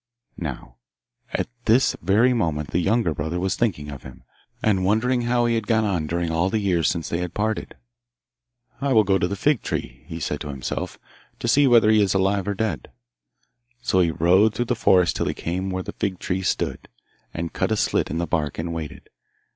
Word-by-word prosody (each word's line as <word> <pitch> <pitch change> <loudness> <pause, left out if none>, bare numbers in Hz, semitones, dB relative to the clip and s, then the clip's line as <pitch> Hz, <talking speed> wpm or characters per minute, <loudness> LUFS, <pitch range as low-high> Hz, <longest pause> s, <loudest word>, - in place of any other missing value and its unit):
Now - - -6 0.5
at - - -1 0.2
this 120 +4 +4
very 110 +6 +3
moment 80 - -1
the 90 - +1
younger 100 -1 +1
brother 80 +4 -3
was 95 +1 0
thinking 80 -11 -1
of 70 - -8
him, 65 0 -12 0.4
and 100 -4 +2
wondering 115 +6 +2
how 120 0 +1
he 120 - +2
had 115 -2 -1
got 110 -1 +3
on 90 -7 -1
during 85 0 -1
all 85 +3 +1
the 110 - 0
years 90 -7 +1
since 85 -2 -2
they 85 - -1
had 90 -1 -4
parted. 110 +1 -2 1.1
'I 140 -1 +1
will 110 -2 +6
go 95 -1 +2
to 90 - +1
the 100 - -3
fig 145 +4 +1
tree,' 60 +2 -5
he 80 - -6
said 75 -3 -3
to 75 - -6
himself, 70 -3 -4 0.4
'to - - -4
see 140 +4 +5
whether 115 -3 +6
he 110 -1 +5
is 100 -2 +1
alive 95 0 +1
or 100 - -1
dead.' 105 -6 -2 0.9
So 95 - +2
he 85 -2 +3
rode 95 +7 +3
through 120 - 0
the - - -3
forest 90 -5 +3
till - - -1
he - - -2
came 95 +3 -3
where 95 0 -3
the - - -7
fig 95 -3 -2
tree 95 +1 -2
stood, - - -2 0.4
and 85 0 -5
cut - - -1
a - - +2
slit - - +1
in 80 - -3
the 85 - 0
bark, 75 -2 -2
and 85 +1 -3
waited. 80 -3 -7
95 Hz, 210 wpm, -23 LUFS, 85-110 Hz, 1.1 s, will